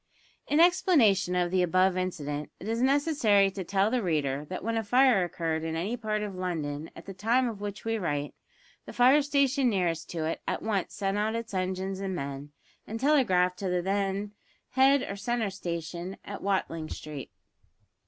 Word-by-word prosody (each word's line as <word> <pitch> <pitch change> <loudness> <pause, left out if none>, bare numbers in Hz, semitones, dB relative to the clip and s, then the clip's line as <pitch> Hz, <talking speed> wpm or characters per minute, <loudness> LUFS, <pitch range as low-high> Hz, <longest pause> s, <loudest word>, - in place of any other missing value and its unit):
In 295 - +2
explanation 290 - +4
of 175 -1 +1
the 185 -1 +2
above 185 +1 +3
incident, 150 -5 -3
it - - -8
is 230 +1 -1
necessary 260 -8 +3
to 190 0 -5
tell 195 +4 +1
the 250 -1 +1
reader 150 -6 -1
that 185 +4 -6
when 230 +2 -1
a 225 - 0
fire 245 -2 +4
occurred 165 -2 -2
in 160 0 -3
any 190 +9 -2
part 215 -3 -2
of 205 -2 -4
London 160 -5 -3
at 165 - -11
the 195 - -7
time 230 +7 +1
of 215 -4 -6
which 205 0 -6
we 225 0 0
write, 145 -5 -2 0.5
the - - -8
fire 260 +4 +5
station 280 -2 +2
nearest 170 -6 -1
to 165 -2 -3
it 160 - -3
at - - -2
once 205 -4 -1
sent 195 0 -1
out 215 +2 0
its 230 -2 -5
engines 190 +1 -2
and 195 -1 -3
men, 140 -1 -5 0.4
and 225 +1 -5
telegraphed 190 -11 +3
to 195 - -2
the 180 -1 0
then 200 +1 -1 0.4
head 270 +1 +4
or 200 - -5
centre 225 0 -1
station 170 0 -5
at 200 - -7
Watling 165 -5 -1
Street. 150 -3 -7
195 Hz, 185 wpm, -28 LUFS, 175-225 Hz, 0.5 s, fire